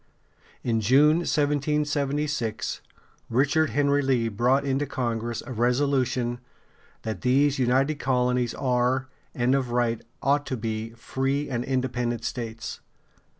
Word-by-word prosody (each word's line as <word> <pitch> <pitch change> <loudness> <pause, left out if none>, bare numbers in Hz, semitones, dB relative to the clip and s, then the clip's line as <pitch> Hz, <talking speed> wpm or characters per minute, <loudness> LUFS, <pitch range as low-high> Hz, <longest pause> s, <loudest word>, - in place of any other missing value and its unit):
In 115 -2 +1
June, 140 +8 +5
1776, 145 -5 0 0.5
Richard 145 +6 +2
Henry 145 0 +2
Lee 125 -4 +1
brought 125 +6 +2
into 140 +1 0
Congress 120 -2 -2
a - - -8
resolution 125 0 +1 0.6
"that 110 -1 -4
these 140 +2 +3
United 135 +4 +2
Colonies 125 -2 +1
are, 130 +1 +1 0.3
and 125 +1 +2
of 135 -3 +1
right 120 -1 0 0.2
ought 145 +1 +2
to 130 - -2
be, 110 0 -3
free 135 +4 -2
and 120 -1 -1
independent 125 -3 -1
States." 115 -2 -5
130 Hz, 115 wpm, -26 LUFS, 120-140 Hz, 0.6 s, June